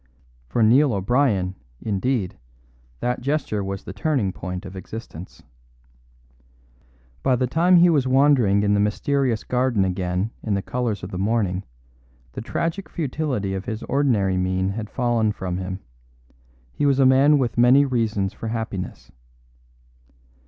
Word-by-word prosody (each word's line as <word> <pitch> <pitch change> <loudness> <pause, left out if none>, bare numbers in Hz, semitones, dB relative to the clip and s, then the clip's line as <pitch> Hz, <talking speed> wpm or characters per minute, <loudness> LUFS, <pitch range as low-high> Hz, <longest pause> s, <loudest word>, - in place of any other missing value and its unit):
For 110 - +1
Neil 130 +4 +5
O'Brien, 100 -2 +1 0.3
indeed, 105 -1 -1 0.7
that 125 0 -1
gesture 130 -7 -1
was 95 0 -5
the - - -8
turning 105 -4 0
point 90 +1 -6
of 95 0 -9
existence. 95 -2 -9 1.8
By 130 - +2
the 125 +1 0
time 170 +8 +3
he 175 +1 +7
was 140 -5 +2
wandering 130 -7 +4
in 105 0 +2
the 100 - +2
mysterious 120 +3 0
garden 125 -5 +1
again 90 +2 -2
in 105 -3 -1
the 100 - -2
colours 120 -6 -2
of 90 - -6
the 90 - -4
morning 100 -3 0 0.7
the - - -6
tragic 165 - -3
futility 135 - -2
of 95 0 -4
his 110 -1 -5
ordinary 115 -9 +1
mien 95 +1 0
had 105 +1 -5
fallen 120 -4 +1
from 90 -3 -4
him; 95 +1 -5 0.9
he 145 - 0
was 140 -2 +3
a 135 - +4
man 135 +3 +5
with 125 -4 -1
many 130 +4 +6
reasons 110 -7 -1
for 115 - -7
happiness. 110 -5 -5
110 Hz, 145 wpm, -23 LUFS, 95-130 Hz, 1.8 s, he